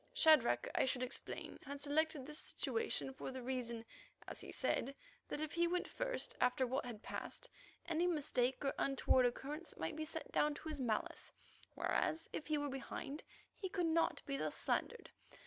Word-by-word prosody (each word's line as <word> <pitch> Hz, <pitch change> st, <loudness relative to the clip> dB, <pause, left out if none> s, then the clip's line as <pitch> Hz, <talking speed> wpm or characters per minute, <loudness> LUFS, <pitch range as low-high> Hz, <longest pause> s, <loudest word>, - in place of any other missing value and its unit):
Shadrach, 305 Hz, -, +6 dB
I -, -, +4 dB
should 255 Hz, -1 st, +1 dB
explain, 255 Hz, -, -3 dB
had 280 Hz, 0 st, -5 dB
selected 295 Hz, -1 st, +2 dB
this 300 Hz, +2 st, -3 dB
situation 455 Hz, -11 st, -1 dB
for 265 Hz, -, -5 dB
the 260 Hz, -1 st, -5 dB
reason, 240 Hz, -3 st, -2 dB, 0.4 s
as -, -, -5 dB
he -, -, -7 dB
said, 275 Hz, +3 st, 0 dB, 0.3 s
that 295 Hz, -, -2 dB
if 310 Hz, -1 st, -1 dB
he 340 Hz, 0 st, +3 dB
went 360 Hz, +1 st, 0 dB
first, -, -, -1 dB
after 250 Hz, +1 st, +4 dB
what 255 Hz, 0 st, -1 dB
had 225 Hz, -2 st, -7 dB
passed, -, -, -4 dB, 0.4 s
any 340 Hz, +1 st, +2 dB
mistake 280 Hz, -5 st, +2 dB
or 275 Hz, -, +2 dB
untoward 260 Hz, -2 st, +4 dB
occurrence 290 Hz, +7 st, -4 dB
might -, -, -2 dB
be 315 Hz, 0 st, -2 dB
set 320 Hz, +1 st, -4 dB
down 300 Hz, 0 st, +3 dB
to 315 Hz, -, -6 dB
his 300 Hz, -3 st, -2 dB
malice, 225 Hz, -4 st, -1 dB, 0.4 s
whereas, 325 Hz, +1 st, +1 dB
if -, -, -3 dB
he 305 Hz, 0 st, +2 dB
were 290 Hz, 0 st, 0 dB
behind, 275 Hz, +2 st, -4 dB, 0.3 s
he 380 Hz, -, -4 dB
could 360 Hz, -2 st, +1 dB
not 330 Hz, 0 st, +2 dB
be 275 Hz, -1 st, -1 dB
thus -, -, 0 dB
slandered. 475 Hz, -, 0 dB
290 Hz, 180 wpm, -39 LUFS, 260-320 Hz, 0.4 s, Shadrach